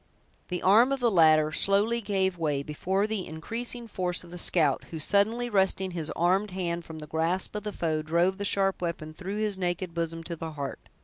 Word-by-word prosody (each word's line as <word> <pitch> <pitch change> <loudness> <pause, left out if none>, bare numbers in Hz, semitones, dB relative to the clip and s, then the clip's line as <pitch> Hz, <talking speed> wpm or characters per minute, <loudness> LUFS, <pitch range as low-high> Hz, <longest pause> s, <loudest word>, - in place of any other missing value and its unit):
The 180 -2 -4
arm 225 +8 +5
of 275 - 0
the 240 -2 +2
latter 155 -4 +5
slowly 205 +7 +2
gave 190 -3 0
way 145 -4 0
before 190 +7 -1
the 215 -3 -3
increasing 230 +9 -6
force 180 -4 -2
of 170 - -14
the 175 - -5
scout, 155 -6 +3
who, 165 - -7
suddenly 205 +9 +2
wresting 190 -3 +2
his 165 -3 -3
armed 190 +5 +2
hand 175 -2 -3
from 160 - -9
the 155 - -8
grasp 165 +4 -1
of 210 - -3
the 210 - -4
foe, 160 -5 -1
drove 170 +5 +1
the - - -2
sharp 195 -2 +1
weapon 165 -3 -4
through 190 +5 -5
his 210 -3 -1
naked 175 -1 -2
bosom 165 0 -3
to 170 +1 -3
the 160 0 -6
heart. 140 -2 -5
180 Hz, 205 wpm, -28 LUFS, 165-200 Hz, -, arm